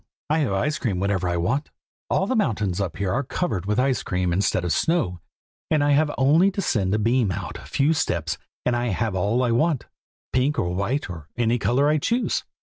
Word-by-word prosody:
I 155 Hz, -, +3 dB
have 140 Hz, -9 st, 0 dB
ice 150 Hz, +11 st, 0 dB
cream 100 Hz, -8 st, -1 dB
whenever 95 Hz, -2 st, 0 dB
I 85 Hz, -, 0 dB
want 135 Hz, -, 0 dB
it. -, -, -30 dB, 0.4 s
All 190 Hz, -, +2 dB
the 255 Hz, -, -1 dB
mountains 105 Hz, -, 0 dB
up 95 Hz, -4 st, -3 dB
here 95 Hz, -1 st, -1 dB
are 135 Hz, -, +1 dB
covered 120 Hz, -, -2 dB
with 105 Hz, +1 st, 0 dB
ice 130 Hz, -3 st, +2 dB
cream 90 Hz, -1 st, -1 dB
instead 90 Hz, -1 st, +1 dB
of 85 Hz, -, +1 dB
snow, 155 Hz, -, 0 dB, 0.5 s
and 155 Hz, -2 st, +3 dB
I 145 Hz, -, +3 dB
have 150 Hz, +2 st, +3 dB
only 155 Hz, +8 st, +5 dB
to -, -, -4 dB
send 105 Hz, -, 0 dB
a -, -, +2 dB
beam 115 Hz, -1 st, +2 dB
out 90 Hz, 0 st, -5 dB
a -, -, -12 dB
few 145 Hz, +4 st, +2 dB
steps 85 Hz, -, -1 dB, 0.3 s
and 125 Hz, -, +2 dB
I 120 Hz, 0 st, 0 dB
have 110 Hz, 0 st, -1 dB
all 105 Hz, +7 st, +1 dB
I 120 Hz, -, +1 dB
want; 150 Hz, +3 st, +1 dB, 0.5 s
pink 135 Hz, +3 st, +1 dB
or 90 Hz, 0 st, 0 dB
white, 110 Hz, +10 st, -1 dB
or 80 Hz, -5 st, -8 dB
any 120 Hz, 0 st, +1 dB
color 135 Hz, +6 st, +2 dB
I 155 Hz, 0 st, +3 dB
choose." 235 Hz, -, 0 dB
120 Hz, 225 wpm, -24 LUFS, 95-145 Hz, 0.5 s, only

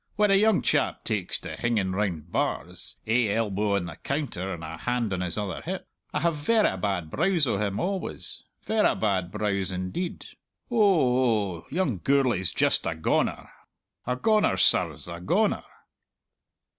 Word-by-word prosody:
When 210 Hz, -1 st, +3 dB
a -, -, +6 dB
young 210 Hz, 0 st, +4 dB
chap 145 Hz, -3 st, +1 dB
takes 105 Hz, -6 st, -1 dB
to -, -, -6 dB
hinging 110 Hz, -6 st, 0 dB
round 90 Hz, -5 st, -2 dB
bars, -, -, -3 dB
ae 110 Hz, -1 st, +2 dB
elbow 105 Hz, -2 st, 0 dB
on 95 Hz, -3 st, -1 dB
the 85 Hz, -1 st, -8 dB
counter 135 Hz, -, -3 dB
and 85 Hz, -3 st, -6 dB
a 80 Hz, -, -6 dB
hand 120 Hz, -4 st, -1 dB
on 90 Hz, -, -2 dB
his 90 Hz, 0 st, -2 dB
other 100 Hz, -5 st, -3 dB
hip, -, -, -5 dB, 0.2 s
I -, -, -1 dB
have 170 Hz, 0 st, +2 dB
verra 215 Hz, +9 st, +2 dB
bad 90 Hz, -6 st, -2 dB
brows 170 Hz, -1 st, +2 dB
o' 115 Hz, -6 st, 0 dB
him 100 Hz, -1 st, -1 dB
always 190 Hz, +1 st, -3 dB, 0.2 s
verra 220 Hz, -1 st, +2 dB
bad 95 Hz, -5 st, 0 dB
brows, 100 Hz, -2 st, -1 dB
indeed. 95 Hz, -, -4 dB, 0.5 s
Oh 125 Hz, -, +3 dB
oh, -, -, -25 dB
young 145 Hz, -, -1 dB
Gourlay's 125 Hz, -7 st, +2 dB
just -, -, +3 dB
a 85 Hz, -, -1 dB
goner! 80 Hz, -, 0 dB, 0.6 s
a 125 Hz, -, +1 dB
goner, 215 Hz, -, +2 dB
sirs -, -, +2 dB
a -, -, -6 dB
goner!" -, -, +1 dB
110 Hz, 160 wpm, -26 LUFS, 95-155 Hz, 0.6 s, a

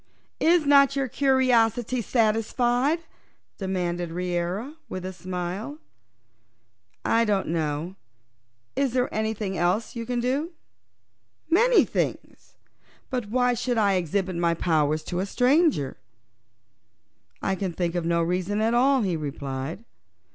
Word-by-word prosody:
"Is 335 Hz, -1 st, +4 dB
not 280 Hz, -1 st, +5 dB
your 275 Hz, -1 st, 0 dB
curiosity 255 Hz, -3 st, +2 dB
yet 235 Hz, -, -3 dB
satisfied?" 240 Hz, +6 st, +1 dB, 0.6 s
demanded 175 Hz, -3 st, -2 dB
Reera, 180 Hz, -, -3 dB
with 185 Hz, 0 st, -5 dB
a 190 Hz, -, -5 dB
smile. 185 Hz, +9 st, -5 dB, 1.3 s
"I 230 Hz, 0 st, +3 dB
don't 205 Hz, -6 st, 0 dB
know. 160 Hz, +2 st, -2 dB, 0.8 s
Is 270 Hz, -2 st, 0 dB
there 250 Hz, 0 st, 0 dB
anything 215 Hz, -3 st, -2 dB
else 185 Hz, +8 st, 0 dB
you 230 Hz, -1 st, -5 dB
can 245 Hz, -1 st, -1 dB
do?" 275 Hz, +8 st, -1 dB, 1.0 s
"Many 470 Hz, +7 st, +5 dB
things. -, -, -4 dB, 0.6 s
But 245 Hz, -5 st, -2 dB
why 245 Hz, +1 st, +2 dB
should 245 Hz, 0 st, -1 dB
I 205 Hz, -3 st, +3 dB
exhibit 185 Hz, +1 st, -1 dB
my 170 Hz, -1 st, +1 dB
powers 155 Hz, -2 st, +1 dB
to 175 Hz, +3 st, -3 dB
a 190 Hz, -, -1 dB
stranger?" 250 Hz, -, +2 dB, 1.5 s
"I 195 Hz, -, +1 dB
can 190 Hz, -1 st, -2 dB
think 170 Hz, 0 st, -2 dB
of 175 Hz, -1 st, -1 dB
no 170 Hz, 0 st, +1 dB
reason 180 Hz, +4 st, -1 dB
at 225 Hz, +2 st, +1 dB
all," 260 Hz, +1 st, +4 dB
he 185 Hz, -4 st, 0 dB
replied. 140 Hz, +3 st, -5 dB
210 Hz, 125 wpm, -25 LUFS, 175-250 Hz, 1.5 s, not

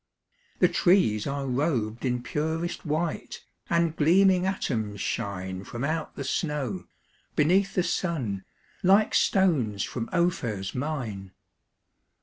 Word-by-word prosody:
The -, -, +5 dB
trees 175 Hz, -, +3 dB
are 140 Hz, 0 st, -2 dB
rob'd 125 Hz, -4 st, -1 dB
in 125 Hz, -1 st, 0 dB
purest 160 Hz, +4 st, -2 dB
white, 155 Hz, +2 st, -2 dB, 0.2 s
And 170 Hz, -1 st, +2 dB
gleaming 185 Hz, +4 st, +4 dB
atoms 110 Hz, -, -2 dB
shine 95 Hz, -1 st, -3 dB
From 120 Hz, +4 st, -6 dB
out 155 Hz, +2 st, -2 dB
the 140 Hz, -, -4 dB
snow, 130 Hz, -, -2 dB, 0.5 s
beneath 190 Hz, +6 st, +3 dB
the 180 Hz, -, +3 dB
sun, 130 Hz, -, -2 dB, 0.4 s
Like 195 Hz, +3 st, +4 dB
stones 140 Hz, -, +2 dB
from 115 Hz, -2 st, -4 dB
Ophir's 120 Hz, -, 0 dB
mine. 120 Hz, -9 st, -4 dB
145 Hz, 115 wpm, -27 LUFS, 110-170 Hz, 0.5 s, The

